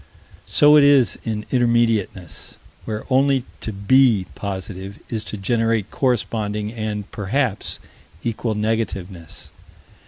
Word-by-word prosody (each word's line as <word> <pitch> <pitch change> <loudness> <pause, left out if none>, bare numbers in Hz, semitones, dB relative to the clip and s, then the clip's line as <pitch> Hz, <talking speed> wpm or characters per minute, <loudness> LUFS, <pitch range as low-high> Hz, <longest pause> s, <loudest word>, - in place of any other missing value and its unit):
So 150 +1 +6
it 145 - +7
is 140 -3 +5
in 110 -1 -2
intermediateness, 115 - 0 0.3
where 110 -1 -4
only 135 -1 +3
to 110 - -5
"be" 110 0 +4
positive 95 0 -6
is 110 -2 -2
to 105 +2 -5
generate 115 +1 0
corresponding 105 -4 -1
and, 110 -3 -3
perhaps, 110 +1 -1 0.5
equal 115 -1 -2
negativeness. 100 -6 -3
110 Hz, 105 wpm, -21 LUFS, 100-120 Hz, 0.5 s, it